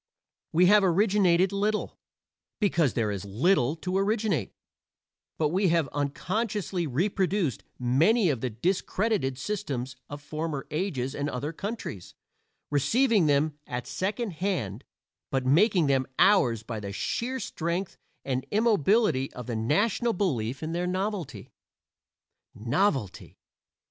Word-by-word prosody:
We 175 +3 +4
have 205 +2 +6
originated 190 -1 +3
little, 210 +2 -1 0.6
because 170 - +2
there 110 -3 0
is 100 -1 -4
little 125 - +2
to 185 +3 -2
originate, 200 - 0 0.9
but 155 -2 +1
we 190 +4 +2
have 165 -3 +2
unconsciously 185 +5 -2
reproduced 180 - 0
many 160 - +3
of 125 -5 -3
the 130 - -1
discredited 180 - -1
systems 130 -6 -4
of 145 - -6
former 150 -1 -4
ages 150 -6 -2
and 145 0 -2
other 145 +5 -4
countries 200 - -6 0.6
receiving 200 - +3
them 145 +1 +1
at 125 0 -4
second 210 +3 -2
hand, 155 - -3 0.4
but 135 -1 -1
making 175 - +4
them 135 -2 +1
ours 150 - +4
by 110 -1 -5
the 100 -1 -6
sheer 250 - -2
strength 175 -2 -3 0.3
and 130 -1 -2
immobility 210 - +2
of 125 - -7
the 120 - -4
national 205 - +1
belief 135 - -1
in 155 - -3
their 175 +1 -1
novelty. 185 - -3 1.0
Novelty! 120 - -1
165 Hz, 125 wpm, -27 LUFS, 130-200 Hz, 1.0 s, have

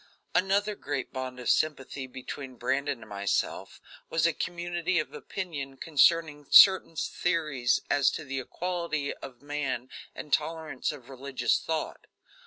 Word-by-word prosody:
Another 200 +3 +2
great 145 -9 -4
bond 130 -1 -5
of 125 - -6
sympathy 140 -3 0
between 130 +1 -7
Brandon 135 +1 -1
and 110 - -11
myself 100 -1 -2 0.3
was 165 0 +2
a 170 - +3
community 175 +1 -2
of 155 - -1
opinion 145 -8 -5
concerning 155 -1 +3
certain 190 -4 +8
theories 150 -8 0
as 140 -2 +4
to 155 - -5
the 135 0 -3
equality 170 0 -2
of 130 -1 -11
men 140 -4 -3 0.3
and 150 - -7
tolerance 155 -3 0
of 135 -5 -11
religious 135 0 0
thought. 160 -1 -4
145 Hz, 135 wpm, -29 LUFS, 130-165 Hz, 0.3 s, certain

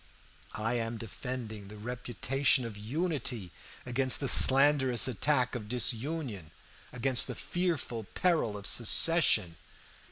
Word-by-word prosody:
I 110 +3 -2
am 115 0 -4
defending 110 -2 -7
the 105 +1 -11
reputation 125 +3 -1
of 115 -3 -7
unity 120 - -3 0.3
against 130 +1 +3
the 140 - -2
slanderous 135 -2 +5
attack 130 +1 0
of 110 -4 -6
disunion, 120 - -2 0.4
against 125 0 -1
the 125 - -6
fearful 140 - -3
peril 160 - 0
of 100 - -10
secession. 115 - +3
125 Hz, 115 wpm, -30 LUFS, 110-135 Hz, 0.4 s, slanderous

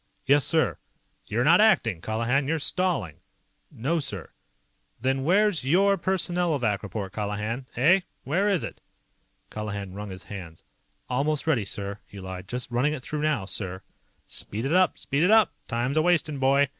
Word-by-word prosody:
"Yes, 140 0 +4
sir!" 160 +1 +2 0.5
"You're 115 +3 0
not 170 +7 +6
ACTING, 115 - +3
Colihan. 115 - 0
You're 165 +2 +1
stalling!" 160 - 0 0.5
"No, 150 +9 -1
sir." 100 - -5 0.7
"Then 130 +2 0
where's 195 +1 +3
your 195 +8 +4
Personnelovac 170 - 0
report, 100 -1 -5
Colihan? 105 +4 -3
Eh? 165 +10 +5 0.2
Where 185 +10 +1
is 195 -5 +1
it?" - - -7 0.7
Colihan 100 -3 -5
wrung 105 +1 -6
his 95 -1 -8
hands. 85 -5 -9 0.4
"Almost 145 +4 0
ready, 130 -10 +1
sir," 100 0 -4
he 100 - -11
lied. 95 0 -7
"Just 125 +2 -4
running 130 +5 +1
it 135 -5 -6
through 150 +2 -4
now, 150 -10 0
sir." 95 -1 -3 0.4
"Speed 110 +5 -3
it 140 - 0
up. 185 0 +3
Speed 140 +1 -1
it 180 - +4
up! 220 -2 +5
Time's 120 +5 -1
a'wastin', 155 -3 +2
boy. 135 +1 +3
135 Hz, 155 wpm, -26 LUFS, 105-160 Hz, 0.7 s, not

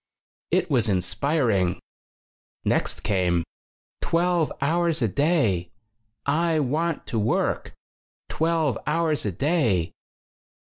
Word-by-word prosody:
It - - +2
was 120 -5 +2
inspiring. 100 - +1 0.9
Next - - 0
came: 90 -4 +1 0.6
"Twelve 170 -1 +1
hours 165 0 +1
a - - +3
day! 110 - +1 0.6
I 160 +2 +2
want 155 +4 -1
to 115 - -2
work! 105 +2 0 0.5
Twelve 160 -6 0
hours 155 -5 +1
a - - 0
day!" 115 - +1
140 Hz, 95 wpm, -25 LUFS, 100-165 Hz, 0.9 s, a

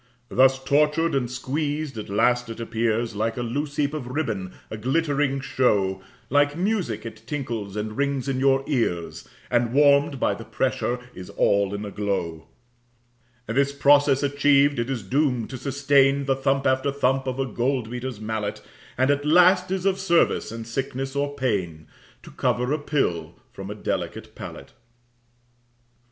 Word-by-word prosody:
Thus 130 +1 +4
tortured 150 +4 +2
and 130 -3 0
squeezed, 145 +3 -3
at 110 -2 -6
last 120 +4 +2
it 115 - -7
appears 115 0 -1
Like 110 +3 -1
a 120 - -2
loose 140 +5 -3
heap 145 0 0
of 145 -5 -5
ribbon, 115 -9 -3 0.2
a - - -3
glittering 140 +3 0
show, 100 -8 +1 0.3
Like 145 +2 +2
music 180 - -1
it 110 -1 -8
tinkles 115 -9 -4
and 105 0 -4
rings 140 -1 -1
in 135 -1 -1
your 135 0 +3
ears, 115 - -2 0.2
And 120 -1 +1
warm'd 140 -1 +4
by - - +2
the - - -8
pressure 125 +1 -1
is 90 0 -9
all 100 -1 +2
in 105 +1 -5
a 100 - -6
glow. 85 -6 -3 1.0
This 140 +5 +1
process 140 0 +4
achiev'd, 140 -1 +3
it 120 +2 -2
is 125 -6 -3
doom'd 125 +1 0
to 130 - -5
sustain 140 +1 +2
The 135 -1 +2
thump 135 0 0
after 130 +2 +2
thump 135 -1 0
of 130 0 -2
a 135 - 0
gold 125 -2 -1
beater's 125 -2 -5
mallet, 110 -1 -3 0.4
And 130 +2 +3
at 145 0 0
last 180 +4 +5
is 190 0 -2
of 195 -1 +2
service 170 - +2
in 115 0 -6
sickness 135 +3 -4
or 145 0 -1
pain 95 - -2 0.4
To - - -12
cover 125 +3 0
a 155 - 0
pill 110 - -1 0.2
from 95 0 -8
a 105 - -5
delicate 105 - -4
palate. - - -9
130 Hz, 165 wpm, -24 LUFS, 115-145 Hz, 1.0 s, last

